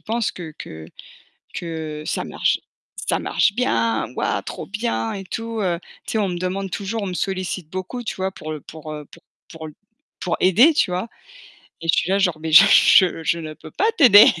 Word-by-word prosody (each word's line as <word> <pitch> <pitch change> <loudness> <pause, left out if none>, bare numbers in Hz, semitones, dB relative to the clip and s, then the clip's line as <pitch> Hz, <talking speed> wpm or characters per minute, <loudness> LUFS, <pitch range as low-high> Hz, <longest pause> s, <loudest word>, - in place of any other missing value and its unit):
pensent 225 -1 -1
que 165 -4 -8
que 80 0 -9 0.7
que 160 -3 -5
ça - - -2
marche, - - 0 0.5
ça - - +2
marche 200 - +1
bien, 115 - 0
ouah - - -1
trop - - -7
bien 225 +1 -2
et 195 -2 -6
tout, 225 +2 -5
heu, 175 -3 0 0.3
tu - - -4
sais, 220 - 0
on 200 -2 +1
me 175 - -3
demande 185 +1 -3
toujours, 205 +4 -3
on - - -3
me 180 - -4
sollicite 185 -3 -3
beaucoup, 185 +7 -5
tu 215 - -5
vois, 190 0 -2
pour 155 -3 -7
heu 150 - -6
pour 155 -1 -9
heu 150 -1 -8 0.4
pour 160 -1 -8 0.5
pour 180 - -1
aider, 230 - +6
tu 185 - +2
vois? 185 +6 -2 0.7
Et 165 - -7
je - - +5
suis 185 - 0
là, 195 - +3
genre: 175 -5 +1
«Mais 160 - -4
je 170 +2 +7
je 170 +1 0
ne 155 -2 -7
peux - - -13
pas 415 - -1
t'aider!» 215 -9 +9
185 Hz, 200 wpm, -21 LUFS, 160-205 Hz, 0.7 s, t'aider